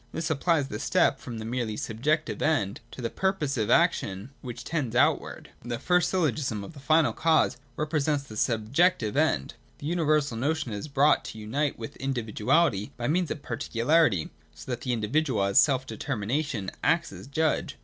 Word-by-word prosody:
This 165 +1 -3
supplies 160 -1 +1
the 105 - -5
step - - +2
from 120 -2 -7
the 110 - -6
merely 115 -2 -2
Subjective 150 +8 -1
End 115 -6 +1
to 125 - -9
the 115 - 0
purposive 150 - -1
action 100 +7 +2
which 120 -2 -7
tends 130 -5 -2
outwards. - - +1
207.] 120 - -7
(i) - - 0
The - - -7
first 180 -2 +2
syllogism 135 - 0
of 130 - -9
the 145 - -12
final 155 +2 +3
cause 160 -5 +2 0.2
repre 155 0 0
sents 145 -1 0
the 110 -6 -11
Subjective 120 - +1
End. 145 - +1 0.2
The - - -9
universal 155 -6 +1
notion 145 -1 -1
is 105 +7 -5
brought 145 +1 +3
to - - -7
unite 135 +7 -2
with 115 - -8
individuality 120 - +1
by 120 0 -2
means 175 +2 +1
of 145 - -5
particu 115 0 -4
larity, 145 - +3 0.2
so 75 +11 -8
that 120 - -3
the 125 - -2
individual 120 0 0
as 100 0 +4
self 130 -3 +3
determination 130 -3 -2
acts - - +1
as - - -10
judge. 155 +2 0
135 Hz, 180 wpm, -27 LUFS, 110-155 Hz, 0.2 s, as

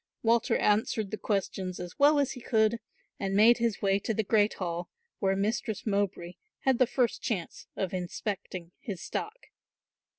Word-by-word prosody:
Walter 230 0 +3
answered 210 -1 +1
the 215 - -3
questions 190 -3 -2
as 180 +8 -8
well 290 +1 +6
as 280 -2 +2
he 250 - -8
could 220 0 +2 0.4
and 195 -1 -1
made 230 +4 +6
his 230 -4 0
way 195 0 +3
to 225 +2 -2
the 220 - +1
great 210 0 +3
hall, 175 -1 -4 0.3
where 195 -1 +2
Mistress 215 +2 -1
Mowbray 195 -4 -1 0.2
had 265 -3 +2
the 255 - +5
first 245 -2 0
chance 185 -8 -4
of 190 -2 -2
inspecting 185 -1 -4
his 195 -5 -6
stock. 455 +4 -5
210 Hz, 165 wpm, -29 LUFS, 190-235 Hz, 0.4 s, well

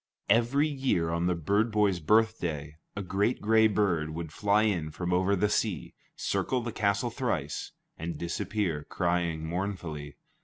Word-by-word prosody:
Every 120 +7 +3
year, 130 - 0
on 85 +1 0
the 90 - +2
bird 100 +8 +1
boy's 105 -4 +2
birthday, 85 -6 +1 0.2
a 100 - -3
great 100 +6 0
gray 110 +1 +5
bird 95 -7 +1
would 80 0 -5
fly 105 +2 +3
in 90 -8 0
from 90 +3 -3
over 95 +3 +3
the 100 +2 +2
sea, 105 -2 -1 0.2
circle 130 - 0
the 120 0 -4
castle 100 +3 0
thrice, 100 - -2 0.3
and 85 +1 -4
disappear, 90 -2 -2
crying 85 -3 0
mournfully. 85 -5 -4
95 Hz, 150 wpm, -29 LUFS, 85-110 Hz, 0.3 s, gray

